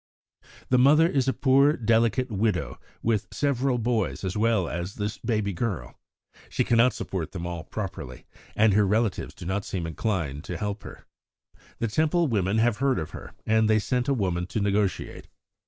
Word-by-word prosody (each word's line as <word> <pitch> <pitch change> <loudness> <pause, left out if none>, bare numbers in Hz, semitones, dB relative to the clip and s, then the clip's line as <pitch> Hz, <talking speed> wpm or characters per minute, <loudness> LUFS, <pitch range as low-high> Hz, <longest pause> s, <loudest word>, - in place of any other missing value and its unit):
"The 125 - +4
mother 150 +5 +6
is 135 -5 0
a - - +4
poor, 140 +2 +4
delicate 115 0 +1
widow, 105 +1 -1 0.2
with 110 -3 +1
several 135 -2 0
boys 115 -4 -1
as 95 -1 -2
well 110 -4 +2
as 85 +4 -4
this 105 0 -4
baby 105 -4 -1
girl. 90 - -4 0.5
She - - 0
cannot 120 +1 +4
support 90 -4 -4
them 85 -3 -5
all 85 -2 -5
properly, 85 - -6 0.3
and 110 -1 +4
her 105 0 +4
relatives 110 0 0
do - - -9
not 95 +3 -1
seem 90 -4 -4
inclined 80 - -2
to 90 - -4
help 105 +2 -3
her. - - -11 0.7
The 115 - -1
Temple 160 +9 +2
women 100 -2 +1
have 115 -1 +2
heard 135 0 +1
of 80 -3 -4
her, - - -9
and 110 0 +3
they 110 - +5
sent 125 +4 -1
a 140 - +3
woman 90 -5 -1
to 110 - -2
negotiate. 100 -1 -1
110 Hz, 175 wpm, -26 LUFS, 95-120 Hz, 0.7 s, mother